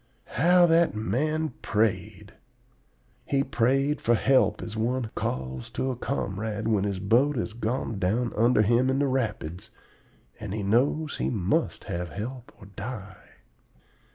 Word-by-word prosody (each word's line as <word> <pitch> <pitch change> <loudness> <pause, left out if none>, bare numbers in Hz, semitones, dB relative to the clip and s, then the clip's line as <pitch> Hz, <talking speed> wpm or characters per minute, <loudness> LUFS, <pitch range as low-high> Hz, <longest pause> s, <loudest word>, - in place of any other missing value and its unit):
"How 175 +4 +5
that 165 -5 +3
man 155 +8 0
prayed! 110 -2 -1 0.9
He 140 -1 +1
prayed 135 +3 +1
for 120 - +3
help 130 +3 +2
as 110 - -6
one 115 +1 -1
calls 65 -1 -4
to 130 - 0
a - - -4
comrade 110 -3 -3
when 105 -3 +2
his 100 -2 -2
boat 120 +9 +3
has 110 -2 -3
gone 115 -2 -2
down 110 +6 0
under 115 0 +4
him 120 +4 +3
in 130 - +1
the 145 - +2
rapids, 110 - -2 0.7
and 105 -2 -5
he 105 - -3
knows 140 +9 +1
he - - -1
must 95 -6 0
have 85 0 -4
help 120 +4 -6
or - - -13
die. 100 0 -8
115 Hz, 145 wpm, -27 LUFS, 105-130 Hz, 0.9 s, How